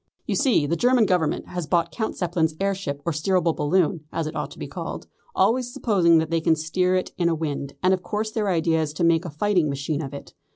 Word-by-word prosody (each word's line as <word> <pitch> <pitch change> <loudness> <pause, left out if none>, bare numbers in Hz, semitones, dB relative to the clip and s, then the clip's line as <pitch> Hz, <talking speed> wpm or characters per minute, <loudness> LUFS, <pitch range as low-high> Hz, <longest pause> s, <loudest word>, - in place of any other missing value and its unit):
You - - -1
see 245 - +3
the 160 +4 0
German 245 +4 +3
Government 180 -5 0
has 175 -3 -4
bought 170 -1 +1
Count 220 +8 -3
Zeppelin's 165 -3 0
air 195 0 +1
ship 145 -7 -5
or 170 - +1
steerable 170 +2 +1
balloon, 155 +1 +1
as 165 - -2
it 155 - -5
ought - - -3
to - - -13
be - - -5
called, - - -6 0.3
always 245 +1 +2
supposing 180 -9 +3
that 160 0 0
they 165 -1 +1
can 160 0 +3
steer 180 +4 0
it 185 - -1
in 170 -1 +3
a 165 - +1
wind, 145 -3 -4
and 185 +1 +4
of 185 - -1
course 210 +4 -3
their 215 -2 -1
idea 165 -2 +2
is 150 -1 -3
to 160 - -2
make 165 +1 +3
a - - -4
fighting 175 +1 +1
machine 140 +2 -2
of 135 -3 -6
it. 140 - -9
170 Hz, 245 wpm, -24 LUFS, 155-190 Hz, 0.3 s, and